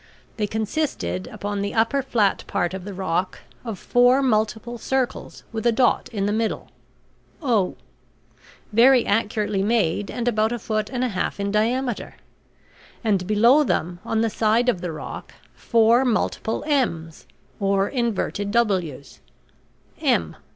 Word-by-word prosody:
They 210 -2 0
consisted, 215 - -2
upon 205 0 -4
the 200 +3 -3
upper 230 +5 +2
flat 220 -7 +1
part 175 +1 -1
of 190 -1 -6
the 205 - -6
rock, 185 -1 -1 0.3
of 225 -5 -5
four 245 +6 +3
multiple 220 0 0
circles 265 0 -2
with 225 -1 -4
a - - +5
dot 245 +2 +2
in 200 -4 -1
the 205 - 0
middle 220 0 -2 0.7
(O), 230 - +1 1.0
very 245 +2 +6
accurately 210 -1 0
made 205 -3 +1
and 240 -1 -3
about 220 -1 +2
a 240 - -1
foot 215 -1 -2
and 255 -1 -2
a 255 - +1
half 195 0 -3
in 200 0 -1
diameter; 235 +3 -1 0.9
and 195 -5 +1
below 235 +8 +5
them, 175 - -1
on 225 0 0
the 225 -1 +1
side 225 +4 +2
of 185 -8 0
the 175 -2 -3
rock, 155 - -8 0.2
four 230 +2 +3
multiple 225 -2 -1
m's 170 - -1 0.3
or 195 -1 +1
inverted 225 -5 -2
w's 185 - -1 0.8
(M). 80 -2 +1
220 Hz, 145 wpm, -23 LUFS, 200-240 Hz, 1.0 s, very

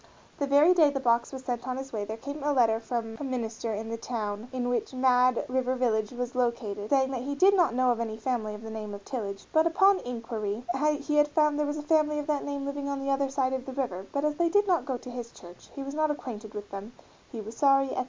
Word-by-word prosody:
The 280 - 0
very 290 +6 +6
day 320 -5 +5
the 280 -1 -2
box 235 -2 +2
was 265 -1 -7
sent 245 0 -3
on 255 0 -2
its 270 -1 -7
way 210 -2 -2
there 220 +2 -5
came 285 +5 -6
a 295 +1 +1
letter 225 -4 +3
from 225 -1 -4
a - - -4
minister 235 -4 -3
in 220 +2 -5
the 230 - -2
town 220 -2 -4
in 250 -1 -2
which 245 +1 -1
Mad 255 -1 +3
River 255 0 0
Village 220 -4 +1
was 245 0 -4
located, 225 -5 -1
saying 265 -1 +3
that 255 -3 -3
he 285 +3 -3
"did 385 +7 +5
not 350 -10 +3
know 255 0 +3
any 225 -2 -3
family 220 -3 -2
of 210 - -10
the 220 - -7
name 215 -2 -5
of 200 - -12
Tillage, 200 -6 -5
but 315 +1 +5
upon 385 +3 +4
inquiry 230 -2 -4 0.4
he 300 +1 0
had 295 0 +6
found 300 0 +3
that - - -3
there 300 -1 +1
was 295 +1 -2
a 295 - -5
family 300 -1 +2
of 295 - -2
that 295 -2 0
name 280 -1 -3
living 280 0 -3
on 280 -1 -2
the 275 0 -1
other 275 0 +1
side 265 -1 0
of 260 0 -3
the 265 - -5
river, 200 -8 -3
but 280 +1 0
as 300 - +2
they 340 -1 +3
did 410 +4 +4
not 345 -9 +1
go 260 -2 -1
to 250 - -10
his 240 -1 -6
church 175 0 -14
he 275 - -4
was 275 +1 -6
not 310 +1 +1
acquainted 220 -7 -5
with 205 0 -7
them; 200 +4 -7 0.4
he 230 - -6
was 220 +2 -7
sorry, 275 +1 +4
etc. - - -2
255 Hz, 270 wpm, -28 LUFS, 225-285 Hz, 0.4 s, very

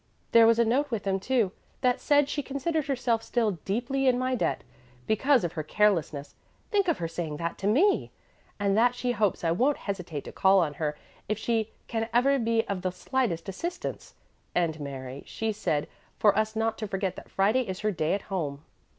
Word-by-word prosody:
There 230 -1 +7
was 230 0 +5
a 235 - +4
note 270 +6 +1
with 225 -5 -2
them, 195 -1 0
too, 230 -2 +1 0.3
that 250 -2 +2
said 290 -1 +4
she 290 - -2
considered 285 +3 -2
herself 245 -4 +1
still 230 -3 0
'deeply 245 +6 0
in 250 -1 +4
my 255 +1 0
debt,' 250 - 0 0.4
because 260 +3 +3
of 175 -1 -2
her 160 - -2
carelessness 155 -5 +1 0.4
think 400 -3 +2
of 340 - +2
her 165 - -2
saying 165 -2 -4
that 170 +1 -4
to 195 - -1
me! 335 - +3 0.5
and 200 -1 +2
that 245 +3 +4
she 245 0 -1
hopes 210 -6 0
I 165 - +2
won't 255 +12 +2
hesitate 180 -7 -5
to - - -8
call 195 0 +4
on 165 -6 +2
her 150 -1 -1 0.3
if 215 - 0
she 220 -1 0 0.2
'can 225 -1 -2
ever 275 +3 +4
be 230 -1 +1
of 195 -2 -2
the 185 - 0
slightest 180 -2 -1
assistance.' 340 - -5 0.4
And 165 -3 +1
Mary, 135 -2 -6
she 225 0 -2
said 155 -8 -1 0.3
for 210 - +4
us 215 +1 0
not 225 0 0
to 215 - -3
forget 195 -1 -2
that - - -10
Friday 210 +7 +2
is 190 -6 -5
her 215 0 +1
day 160 -2 0
at 200 - -5
home." 150 -7 -4
215 Hz, 200 wpm, -28 LUFS, 180-250 Hz, 0.5 s, There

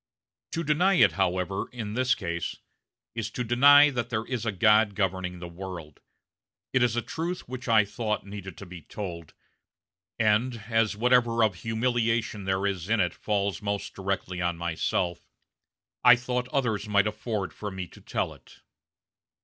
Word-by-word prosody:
To 165 - -1
deny 175 +6 +3
it, - - +6
however, 95 0 -1
in 110 -4 -5
this 125 +2 +2
case, 85 -1 -4 0.6
is 115 -1 -3
to 125 - -3
deny 145 +5 +7
that 120 -3 -3
there 110 -2 -2
is 120 -3 -3
a - - +2
God 105 +1 +4
governing 95 -2 -1
the 90 0 -7
world. 85 -4 -8 0.7
It 130 - +3
is 120 -2 +2
a 120 - 0
truth 170 +3 -4
which 130 +1 -7
I 110 -3 +5
thought 105 0 -3
needed 100 -1 -8
to 100 - -9
be 90 -2 -10
told, 85 -2 -7 0.8
and, 115 +3 +2
as 110 -2 +2
whatever 120 -1 +3
of 110 -3 +3
humiliation 115 0 -1
there 95 +1 0
is 95 -2 -2
in 115 -1 +2
it 90 -2 +1
falls 100 -1 -1
most 100 -1 -3
directly 95 -2 -3
on 85 -1 -1
myself, 85 +1 -1 0.8
I 125 -1 +9
thought 125 0 -2
others 115 -7 -1
might 100 -1 +4
afford 105 -2 -3
for 105 - -5
me 95 -2 -5
to - - -16
tell - - -2
it." - - -19
105 Hz, 165 wpm, -27 LUFS, 95-120 Hz, 0.8 s, I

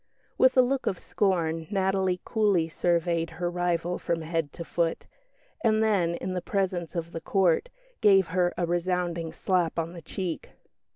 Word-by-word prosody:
With 260 0 +4
a 255 - +8
look 265 +1 -1
of 185 - 0
scorn 165 -6 0
Natalie 190 -2 +1
coolly 205 -7 +2
surveyed 170 0 0
her 175 0 -1
rival 175 0 -1
from 165 -1 -1
head 165 -2 -2
to 170 - -7
foot; 165 -1 -1 0.6
and 220 -1 +3
then, 185 -6 +2
in 185 +1 -4
the 180 - -2
presence 185 -4 -2
of 170 0 -3
the 165 - -6
Court, 190 - +2 0.3
gave 195 -4 +5
her 175 0 +2
a 175 - +1
resounding 175 -1 -1
slap 175 -3 0
on 165 +1 -2
the 170 - -9
cheek. 175 +1 -5
175 Hz, 165 wpm, -27 LUFS, 165-190 Hz, 0.6 s, a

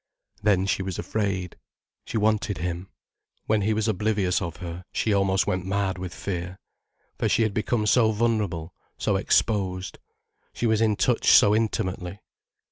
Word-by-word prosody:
Then 95 -2 +3
she 100 - 0
was 95 -2 -4
afraid. 95 -4 -2 0.5
She - - -3
wanted 105 -1 +1
him. 90 +3 -4 0.6
When 110 -1 +2
he 105 +2 +1
was 110 0 0
oblivious 105 -3 +1
of 85 -3 -4
her, 85 0 -7
she 110 - 0
almost 95 -1 +2
went 90 0 -1
mad 95 -1 -1
with 90 -1 -5
fear. 90 -1 -5 0.6
For - - +1
she 115 - +3
had 110 -2 0
become 110 +1 0
so 110 +1 +4
vulnerable, 105 -7 -1 0.2
so - - 0
exposed. 95 -4 0 0.5
She - - -3
was 110 -1 +2
in 110 -2 +3
touch 120 +3 +2
so 105 - +7
intimately. 95 -4 -2
100 Hz, 155 wpm, -25 LUFS, 90-110 Hz, 0.6 s, so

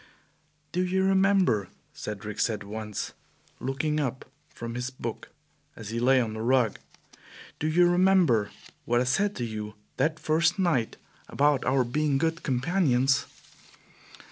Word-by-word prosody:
"Do 180 - 0
you 190 +1 +1
remember," 190 - +3 0.2
Cedric 105 0 -6
said 105 -3 0
once, 105 0 -5 0.5
looking 150 +4 -1
up 130 -3 -3 0.2
from 115 0 -7
his 125 +1 -3
book 130 - -6 0.5
as 105 -2 -8
he 115 - -2
lay 130 +2 +4
on 115 -3 -1
the 110 - -5
rug, 120 -2 +2 0.8
"do 155 - -1
you 175 +3 +4
remember 175 - +3 0.4
what 120 +1 +2
I - - +2
said 195 +11 +1
to 120 - -3
you 105 -1 -6 0.2
that 160 +1 +1
first 160 +5 +2
night 165 - 0 0.3
about 145 -1 +2
our 130 0 +3
being 145 +3 0
good 165 +3 -1
companions? 135 -1 +1
130 Hz, 140 wpm, -27 LUFS, 115-165 Hz, 0.8 s, lay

